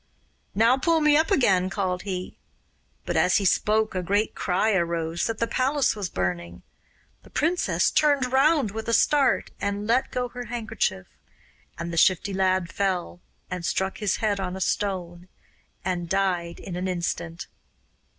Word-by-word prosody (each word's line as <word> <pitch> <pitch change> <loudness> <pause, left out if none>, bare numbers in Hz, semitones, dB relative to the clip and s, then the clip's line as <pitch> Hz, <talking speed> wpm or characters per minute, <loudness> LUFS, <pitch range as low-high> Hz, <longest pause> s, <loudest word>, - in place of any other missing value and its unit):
'Now 230 +5 +4
pull 330 +2 +2
me 300 -1 +4
up 315 +2 +3
again,' 195 - +3
called 185 -2 -2
he; 185 -2 -5 0.7
but - - -2
as - - +4
he 200 - -1
spoke 215 +3 +2
a 185 - -1
great 205 +4 0
cry 200 +4 +1
arose 170 -2 -1
that 225 -2 -3
the 230 - +1
palace 265 +2 +1
was 200 -4 -4
burning. 90 -1 -3 0.6
The - - -18
princess 340 +5 +1
turned 280 -4 +2
round 275 -4 +3
with 220 +1 -6
a - - +1
start, 285 -2 +2
and 200 +1 -2
let 235 +4 +1
go 250 -1 -2
her 245 0 -7
handkerchief, 225 - -2 0.7
and 170 +1 -5
the - - -4
Shifty 185 +3 +3
Lad 185 -2 +1
fell, 180 -2 -2 0.3
and 180 -1 -4
struck 190 +2 -1
his 210 -2 0
head 210 -2 -1
on 185 -1 -3
a - - -6
stone, 180 -3 -2 0.6
and 175 -2 -2
died 180 -3 -1
in 180 - -7
an 180 +1 -2
instant. 170 -1 -3
195 Hz, 160 wpm, -25 LUFS, 180-230 Hz, 0.7 s, Now